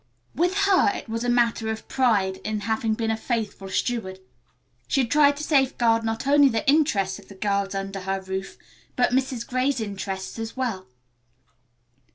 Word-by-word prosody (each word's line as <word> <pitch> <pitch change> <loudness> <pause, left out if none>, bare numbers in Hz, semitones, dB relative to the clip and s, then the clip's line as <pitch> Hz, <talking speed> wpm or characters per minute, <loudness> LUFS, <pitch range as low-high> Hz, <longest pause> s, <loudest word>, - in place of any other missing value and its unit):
With 355 +3 +1
her 390 0 +4
it - - -7
was 230 +1 -3
a 245 - 0
matter 235 -2 +2
of 220 0 -5
pride 205 -8 +1
in 215 +1 -4
having 220 0 0
been 225 0 -1
a - - +1
faithful 220 -4 -3
steward. 190 -2 -2 0.7
She 270 - +2
had 235 - -3
tried 290 -1 +5
to 300 - -5
safeguard 255 -6 +2
not 225 +2 -2
only 285 0 +5
the 225 +4 -2
interests 265 -11 +2
of - - -17
the 200 - -12
girls 200 0 -1
under 195 0 -4
her 195 +1 -2
roof, 190 0 -6 0.4
but 245 - +2
Mrs. 255 -2 0
Gray's 255 +2 0
interests 195 -1 -5
as 225 +2 -6
well. 230 -8 -3
225 Hz, 175 wpm, -24 LUFS, 200-260 Hz, 0.7 s, tried